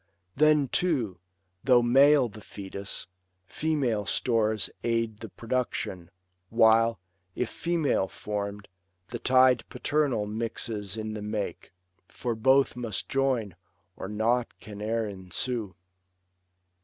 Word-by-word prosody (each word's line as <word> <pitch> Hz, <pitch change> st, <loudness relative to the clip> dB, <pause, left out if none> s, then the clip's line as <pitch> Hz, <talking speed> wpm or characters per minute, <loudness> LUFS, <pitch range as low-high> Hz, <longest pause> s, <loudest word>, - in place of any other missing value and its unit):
Then, 150 Hz, -1 st, +4 dB
too, 125 Hz, -, 0 dB, 0.4 s
though 125 Hz, -3 st, +5 dB
male 135 Hz, +2 st, +6 dB
the 105 Hz, -1 st, -12 dB
fetus, 100 Hz, -1 st, -6 dB, 0.4 s
female 130 Hz, -5 st, -1 dB
stores 110 Hz, -4 st, +1 dB, 0.2 s
Aid 115 Hz, -2 st, 0 dB
the 110 Hz, -, -8 dB
production; 115 Hz, -7 st, -3 dB, 0.4 s
while, 115 Hz, -1 st, +4 dB, 0.4 s
if 125 Hz, -, -2 dB
female 165 Hz, -, 0 dB
form'd, 100 Hz, 0 st, -5 dB, 0.4 s
The -, -, -5 dB
tide 130 Hz, -2 st, +5 dB
paternal 145 Hz, -8 st, 0 dB
mixes 110 Hz, -1 st, -3 dB
in 110 Hz, 0 st, -4 dB
the 105 Hz, -, -5 dB
make; 105 Hz, -1 st, -4 dB, 0.4 s
For 120 Hz, -, -3 dB
both 130 Hz, +5 st, +3 dB
must 115 Hz, -6 st, -4 dB
join, 130 Hz, -9 st, 0 dB, 0.4 s
or -, -, -6 dB
nought 115 Hz, +4 st, +1 dB
can 105 Hz, -1 st, -10 dB
e'er 110 Hz, +1 st, 0 dB
ensue. 100 Hz, +2 st, -3 dB
115 Hz, 110 wpm, -28 LUFS, 105-130 Hz, 0.4 s, male